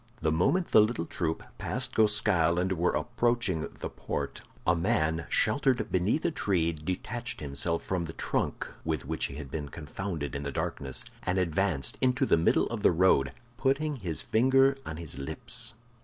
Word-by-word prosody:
The 80 -1 +2
moment 130 - +2
the - - +8
little 110 -5 0
troop 80 -2 -2 0.2
passed 130 +1 -3
Goskal 95 -6 +4
and 90 +1 +1
were 90 -1 +2
approaching 120 -8 0
the - - -2
Post, - - -4 0.2
a 85 - +4
man 85 -4 +1
sheltered 135 -3 +2
beneath 95 - +1
a 170 - +2
tree 90 - +1
detached 95 +10 -4
himself 75 +4 -1
from 90 -2 -1
the 80 - -7
trunk - - -2 0.2
with 80 -5 -2
which 80 +3 -1
he 70 - -5
had 70 -3 -7
been 75 -2 -4
confounded 80 0 -5
in 70 - -3
the 70 0 -3
darkness, 65 -1 -3 0.2
and 90 +1 -1
advanced 85 -6 0
into 130 +1 +3
the - - +4
middle 80 +1 +3
of 115 -3 -3
the - - +5
road, 80 -6 +4 0.3
putting 140 +3 +1
his 85 - -3
finger 135 +4 +4
on 80 - -5
his 75 -5 -7
lips. 70 - -5
90 Hz, 170 wpm, -29 LUFS, 80-120 Hz, 0.3 s, the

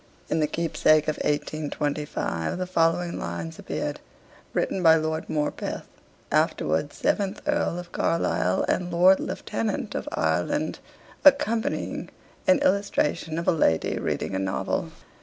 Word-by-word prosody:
In - - +1
the 155 - +2
'Keepsake' 155 -1 +2
of 155 - 0
1825 150 - -2
the 185 - -2
following 170 0 +1
lines 85 -1 -5
appeared, - - -3 0.5
written 190 - -1
by 165 -2 +7
Lord 160 0 -2
Morpeth, 150 -1 -2 0.5
afterwards 80 - +1
seventh 200 0 0
Earl 295 - 0
of 175 0 -8
Carlisle, 95 - +1
and 180 -1 0
Lord 180 +3 +6
Lieutenant 110 0 -3
of - - -3
Ireland, 85 - 0 0.4
accompanying 275 -6 +2 0.4
an 280 0 +6
illustration 185 - +1
of 170 - -3
a - - +6
lady 80 - +1
reading - - -2
a 95 - 0
novel. 95 0 -1
160 Hz, 125 wpm, -26 LUFS, 145-180 Hz, 0.5 s, by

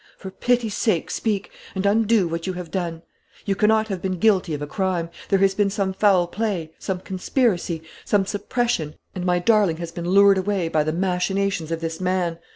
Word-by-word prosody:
For 190 - -8
pity's 240 0 0
sake, 215 -8 0
speak, 205 -3 -2 0.2
and 190 +1 -2
undo 215 -1 +3
what 165 +2 -4
you 185 - -1
have 180 -2 -7
done. 170 -3 -3 0.4
You 200 - +1
cannot 215 +2 +3
have 190 -3 -3
been 185 -1 -2
guilty 185 -5 +2
of 145 - -7
a - - -2
crime. 175 0 -2 0.2
There 195 - +4
has 195 0 +3
been 200 0 +2
some 195 -1 -1
foul 190 -3 +4
play, 175 -4 -3
some 185 -2 -3
conspiracy, 185 - -1 0.2
some 200 -2 +2
suppression; 205 -6 -1 0.2
and 180 - -4
my 180 0 +3
darling 200 -3 +3
has 170 0 -6
been 170 +1 -4
lured 200 0 +6
away 190 -3 -1
by 155 -2 +2
the 155 - -1
machinations 185 0 -1
of 165 0 -2
this 165 +1 -4
man. 180 -2 0
190 Hz, 195 wpm, -23 LUFS, 170-205 Hz, 0.4 s, lured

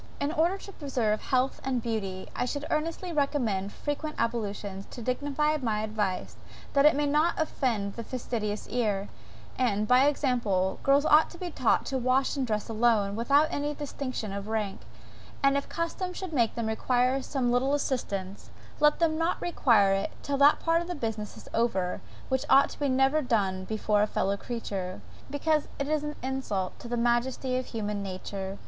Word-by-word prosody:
In 285 - 0
order 335 +5 +2
to 395 - -10
preserve 245 - -1
health 260 +1 0
and 260 -2 0
beauty, 205 -5 -3
I - - 0
should 285 +3 -3
earnestly 330 +3 -2
recommend 240 -10 0
frequent 305 +4 -4
ablutions, 205 -4 -2
to 240 - -8
dignify 290 +5 0
my 220 -6 -1
advice 210 -4 -2 0.4
that 280 +1 +6
it 305 - +5
may 295 +1 +1
not 305 +4 +2
offend 230 -10 -1
the 230 - -6
fastidious 220 -4 -3
ear; 210 -5 0 0.5
and, 215 -4 +1
by 255 +4 +6
example, 235 -10 +1
girls 280 +2 +4
ought 310 +1 +6
to 345 - -12
be 355 0 -5
taught 255 -6 +2
to 265 -1 -1
wash 255 +3 +2
and 270 -3 -1
dress 215 -2 -1
alone, 220 -3 +2
without 285 +7 +3
any 290 +1 -2
distinction 255 -7 -4
of 200 +1 -5
rank; 215 -3 -2 0.6
and 275 0 +5
if 280 - -1
custom 360 +2 -3
should 370 -2 -6
make 235 -5 +2
them 235 - -2
require 250 +4 +1
some 255 -2 -1
little 265 +3 +2
assistance, 200 -9 -3 0.3
let 300 0 +5
them 320 -1 +1
not 330 +2 +1
require 225 - +3
it 195 - -1
till 280 -1 -1
that 285 +1 +6
part 330 0 +2
of 345 - -6
the 355 - -3
business 220 -5 -4
is - - -13
over 195 -6 0 0.3
which 260 -1 0
ought 275 +2 +4
never 270 +1 +3
to - - +2
be 265 - -7
done 190 -6 +1
before 210 0 +1
a 210 - +3
fellow 200 -1 0
creature; 195 -5 -4 0.3
because 300 +2 +1
it 280 - -2
is 305 0 0
an 300 0 -4
insult 255 -8 -2
to - - -9
the 240 0 -2
majesty 240 +2 +1
of 255 0 -2
human 210 -3 -3
nature. 195 0 -5
250 Hz, 180 wpm, -28 LUFS, 210-290 Hz, 0.6 s, that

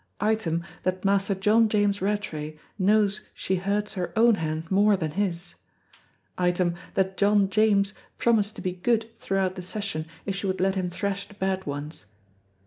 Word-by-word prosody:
Item, 195 -6 0 0.2
that 185 +1 -2
Master 195 0 +2
John 215 +4 +4
James 205 -2 +1
Rattray 155 -7 -2 0.2
knows 205 +1 +3
she 190 - -1
hurts 200 +3 -1
her 180 -4 -3
own 230 +1 +6
hand 160 -2 -3
more 200 +1 +4
than 160 -4 -2
his. 175 -1 -2 0.9
Item, 180 -1 +2 0.2
that 190 0 0
John 200 -1 +3
James 210 -1 +3 0.2
promised 215 -3 +2
to - - -8
be 185 - 0
good 225 +5 0
throughout 190 -1 0
the 185 - -7
session 180 -4 -4 0.2
if 195 - -2
she 195 0 -3
would 190 0 -1
let 190 +1 +2
him 185 -2 -1
thrash 200 +2 -3
the 205 - -16
bad 190 -2 -2
ones. 145 - -5
195 Hz, 165 wpm, -26 LUFS, 180-205 Hz, 0.9 s, own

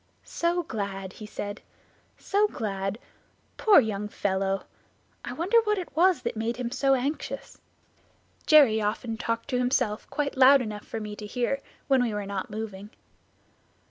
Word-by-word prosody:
"'So 345 +1 -1
glad!' 195 - -5
he 215 - -9
said, 205 0 -6 0.6
'so 415 +1 +2
glad!' 195 - -3 0.6
Poor 425 -7 +7
young 210 -4 -1
fellow! 195 -1 -1 0.6
I - - -5
wonder 390 +8 +3
what 425 -1 +1
it 360 -3 -6
was 350 -4 +4
that 235 - -2
made 225 +2 -2
him 245 -2 -3
so 270 +1 +3
anxious!" 275 +4 -4 0.9
Jerry 270 -8 +6
often 225 +2 -2
talked 230 0 -3
to 250 -2 0
himself 250 -4 0
quite 290 -1 -2
loud 270 +1 +7
enough 215 -4 -5
for 225 - -4
me 210 -1 -6
to 210 - -7
hear 250 +5 -1 0.3
when 270 -2 +4
we 230 -4 0
were 205 -1 -3
not 195 -1 -4
moving. 210 -2 -6
230 Hz, 155 wpm, -27 LUFS, 210-275 Hz, 0.9 s, Poor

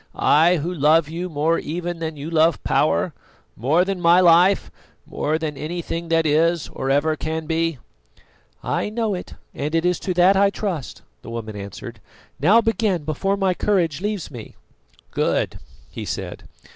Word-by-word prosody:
I, 165 +4 +4
who 170 +2 -2
love 155 0 +3
you 175 +3 -4
more 160 +2 +1
even 175 +2 -4
than 160 -2 -4
you 145 +4 -6
love 165 -1 +2
power, - - +1 0.4
more 150 - +2
than 195 -2 -3
my 170 +1 +6
life, 180 +2 +4 0.3
more 155 +2 -1
than 155 -2 -4
anything 165 +2 -4
that 165 -1 +2
is 160 +2 +2
or 135 - -4
ever 145 +3 +2
can 160 +1 -4
be." 165 -1 -1 0.9
"I - - -1
know 220 -1 -1
it, 180 - -7 0.2
and 150 +3 -3
it 165 +1 +1
is 180 0 +1
to 185 -3 -3
that 180 +3 +5
I 200 +1 +4
trust," 190 - -5 0.2
the - - -10
woman 115 -2 -6
answered. 100 -1 -8 0.4
"Now 200 - +5
begin, 215 -6 0
before 195 +7 -1
my 190 -2 +1
courage 180 -5 0
leaves 205 -5 -3
me." 120 -5 -10 0.6
"Good," - - -1 0.3
he - - -6
said. - - -5
165 Hz, 165 wpm, -22 LUFS, 155-180 Hz, 0.9 s, my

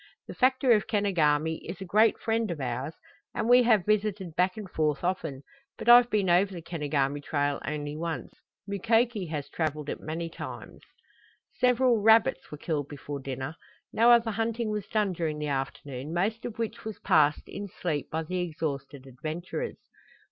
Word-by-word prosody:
"The - - -7
factor 260 0 +3
of 210 -3 +4
Kenogami 160 -7 +1
is - - -7
a 190 - -6
great 215 +4 +4
friend 225 -1 -1
of 170 -3 -4
ours 130 +4 -3 0.4
and 220 - -1
we 245 +1 +7
have 220 -6 +3
visited 205 -5 0
back 185 +2 +1
and 210 -3 -6
forth 155 -3 -1
often, 160 -7 -2 0.3
but - - -8
I've 240 0 +8
been 210 -4 +1
over 180 +3 +4
the 170 - -6
Kenogami 145 -4 -1
trail 145 -1 -1
only 145 0 -3
once. 165 +1 -4 0.3
Mukoki 225 0 +1
has 150 -3 -4
traveled 150 -1 -3
it - - -4
many 165 +2 -4
times." 165 - -8 0.7
Several 250 -2 +3
rabbits 220 +1 +4
were 150 - -6
killed 145 -2 -2
before 145 0 -6
dinner. 135 +3 -5 0.4
No 230 +2 +5
other 235 -1 +5
hunting 225 +1 -1
was 210 -2 -3
done 210 -4 0
during 160 -3 -2
the 150 0 -3
afternoon, 135 0 -4
most 215 +6 -1
of 235 - -6
which 230 -1 -4
was 220 -2 -6
passed 150 0 +3
in 200 0 -6
sleep 160 -6 -3
by 160 +1 -2
the 180 +3 -3
exhausted 150 -5 -4
adventurers. 155 - -5
175 Hz, 170 wpm, -28 LUFS, 150-215 Hz, 0.7 s, I've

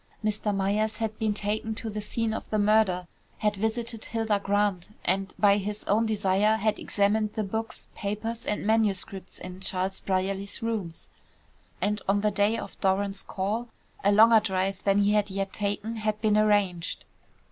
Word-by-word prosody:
Mr. 210 0 0
Myers 205 +2 0
had 220 -1 -2
been 220 -1 +1
taken 215 +2 -1
to 225 - -6
the 210 -1 -3
scene 225 +1 -1
of - - -6
the 215 - 0
murder, 205 -4 +3 0.3
had 210 -1 0
visited 220 +2 -1
Hilda 225 -3 0
Grant, 200 -2 0 0.2
and 195 +2 0
by 200 -1 +5
his 210 +1 -4
own 220 +3 +2
desire 205 0 +2
had 215 0 0
examined 210 +1 +1
the 215 - -1
books, 225 +4 -4
papers, 220 +3 -4
and 210 - -1
manuscripts 200 -3 0
in 185 0 -8
Charles 190 0 -1
Brierly's 195 +2 -1
rooms, 205 -8 -3 0.7
and 205 +3 0
on 200 +1 +3
the 210 0 +2
day 205 +3 +2
of - - -8
Doran's 195 0 +1
call, 210 +5 -2 0.4
a 200 - +4
longer 220 +2 +7
drive 190 -2 -1
than 200 0 +4
he 205 - +3
had 210 -1 +2
yet 195 0 -3
taken 210 +2 -2
had 215 -1 -1
been 215 -1 +2
arranged. 205 -5 +1
205 Hz, 170 wpm, -27 LUFS, 195-220 Hz, 0.7 s, longer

